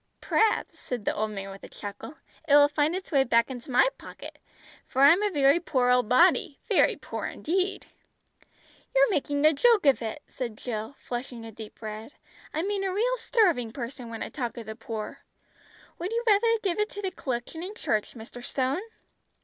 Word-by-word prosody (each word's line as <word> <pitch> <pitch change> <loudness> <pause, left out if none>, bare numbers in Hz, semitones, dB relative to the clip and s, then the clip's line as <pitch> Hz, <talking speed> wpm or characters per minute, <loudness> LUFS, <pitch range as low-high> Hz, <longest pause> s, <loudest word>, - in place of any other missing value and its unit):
"P'raps," 440 0 +1
said 240 -5 -5
the - - +1
old 215 +1 -1
man 195 -2 -6
with 195 - -11
a - - -9
chuckle, 205 +8 -8 0.3
"it 285 - +6
will 290 0 +8
find 295 +3 +1
its 375 0 -6
way 275 -3 +4
back 235 0 +2
into 245 0 -8
my 250 - +5
pocket, - - -10 0.5
for 265 +1 +1
I'm 330 +8 +7
a 420 - +2
very 285 -2 +4
poor 255 -7 +1
old 250 -3 +3
body, 300 +1 +4
very - - +4
poor - - -5
indeed!" 375 +4 -1 1.1
"You're - - +5
making 290 -3 0
a 310 - +7
joke 445 - +4
of 275 -3 +4
it," 230 +6 -5
said 235 -4 -6
Jill, 220 +2 -5
flushing 240 -1 -6
a 225 - -8
deep 220 +1 -11
red. 220 +5 -7 0.4
"I 315 - -2
mean 400 0 -1
a 385 - 0
real 480 +6 +1
starving 350 - +2
person, 245 -1 -6
when 225 -1 -5
I - - -6
talk 245 -4 -4
of 230 - -6
the 220 +1 -7
poor. 220 -1 -6 0.8
Would 355 +4 -3
you 470 +1 -1
rather 425 0 +4 0.2
give 380 -1 0
it 420 0 +1
to 410 - -7
the 380 - -1
collection 255 +4 -4
in 385 +4 -6
church, 215 - -1
Mr. 240 +1 -10
Stone?" 265 +6 -1
275 Hz, 195 wpm, -27 LUFS, 235-370 Hz, 1.1 s, will